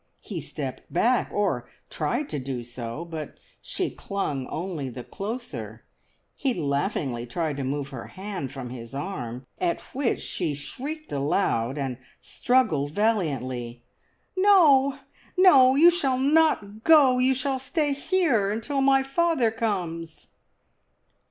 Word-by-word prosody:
He - - -5
stepped - - -7
back, - - +2
or - - -1 0.2
tried 295 - -1
to 150 - -3
do 130 -2 -4
so, 120 +5 -6
but 160 -3 -7 0.2
she - - -3
clung 150 -10 -3
only 165 -6 -4
the 125 0 -8
closer; 150 - -6 0.5
he 270 -3 0
laughingly 140 -5 -1
tried 155 +2 -2
to 140 - -2
move 135 +1 -2
her 130 -4 -8
hand 190 -8 -6
from 130 -3 -7
his 115 0 -8
arm, 130 -7 -5
at 345 -2 0
which 265 -2 0
she 160 -6 -3
shrieked 295 - -6
aloud, 140 -3 0
and 135 -3 -3 0.2
struggled 220 - +1
valiantly. 130 - -1 0.5
"No, 310 -9 +5 0.4
no, 270 -9 +7
you 335 +5 +8
shall 275 -7 +1
not 265 -7 +2
go! 280 -6 +6
You 260 +1 +3
shall 265 +1 -1
stay 290 +2 0
here 275 - +1
until 250 +7 -1
my 270 0 +4
father 275 -4 +2
comes!" 170 -8 -3
195 Hz, 130 wpm, -26 LUFS, -, 0.5 s, you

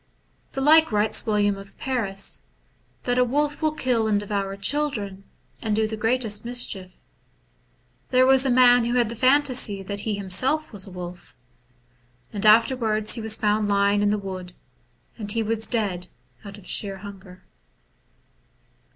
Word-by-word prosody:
The 270 - -3
like 315 +1 +5
writes 215 +2 +1
William 205 -2 +1
of 195 0 -14
Paris, 210 -7 -2 0.3
— - - -40
that 245 0 0
a - - +5
wolf 290 +5 -1
will 310 -1 0
kill 240 -6 0
and 210 -1 +2
devour 200 -1 -3
children, 200 -4 -2 0.4
and 215 -2 -1
do 220 0 +1
the 220 - -4
greatest 225 -1 0
mischief. 220 -6 -2 1.2
There 255 0 +4
was 265 0 +5
a 270 - 0
man 245 -1 +5
who 240 +1 -1
had 240 -3 +2
the 235 - -6
phantasy 255 -6 +2
that 200 +1 -6
he 210 0 -2
himself 230 +11 -1
was 200 -1 -2
a - - -11
wolf. 180 0 -9 1.0
And 205 0 0
afterwards 220 -1 +3
he 235 - -3
was 220 0 +2
found 210 0 +1
lying 200 0 +2
in 205 - +2
the 210 - +1
wood, 185 -2 -7 0.7
and 205 -2 -1
he 225 +1 0
was 220 0 0
dead 195 -7 -1 0.4
out 200 -1 -10
of 200 - -13
sheer 195 0 -1
hunger. 190 -2 -12
215 Hz, 160 wpm, -23 LUFS, 200-245 Hz, 1.2 s, like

